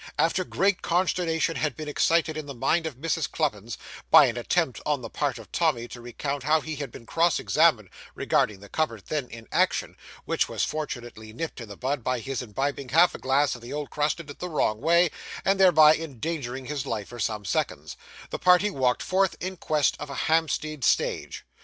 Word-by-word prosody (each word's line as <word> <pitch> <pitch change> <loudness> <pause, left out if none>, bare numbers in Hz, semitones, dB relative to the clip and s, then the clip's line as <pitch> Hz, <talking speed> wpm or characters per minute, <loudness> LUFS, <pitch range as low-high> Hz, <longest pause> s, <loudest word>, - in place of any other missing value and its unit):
After 170 +3 +2
great 195 +1 +1
consternation 165 -2 0
had 155 -4 -1
been 155 -1 -6
excited 160 +2 +2
in 155 -2 -5
the 140 - -7
mind 160 +7 +1
of 155 - -6
Mrs. 160 +1 -1
Cluppins, 115 -8 -2 0.3
by - - +9
an - - -1
attempt - - 0
on - - 0
the - - -7
part - - -1
of - - -12
Tommy 120 0 +1
to 120 - -9
recount 140 +4 -4
how 155 +4 +3
he 155 0 -6
had 145 -1 -5
been 115 - -11
cross 165 +5 +2
examined 150 - +3 0.3
regarding 100 -2 +1
the 105 - -11
cupboard 115 -4 -2
then 150 -5 -1
in 115 -1 -11
action - - +1 0.3
(which - - 0
was - - -1
fortunately 120 -7 -5
nipped 155 +1 -5
in 115 - -9
the 100 - -9
bud 130 0 -2
by 125 +1 0
his 135 +2 -4
imbibing 135 +4 -3
half 170 +5 +5
a - - -7
glass 135 +2 +2
of 120 - -9
the 120 +4 -8
old 150 -1 -4
crusted 150 +3 -1
'the 180 +5 -6
wrong 110 -9 0
way,' 170 +1 +4 0.3
and 195 0 +2
thereby 160 -5 +7
endangering 140 -4 -4
his 145 -1 -4
life 105 -3 -3
for 120 - -9
some 105 -1 -2
seconds), - - -2 0.4
the - - -3
party 180 +3 +4
walked 130 -6 +1
forth 190 0 +1
in 185 +1 -4
quest 155 -4 +1
of - - -6
a 140 - -6
Hampstead 155 -3 0
stage. - - 0
145 Hz, 200 wpm, -26 LUFS, 125-165 Hz, 0.4 s, by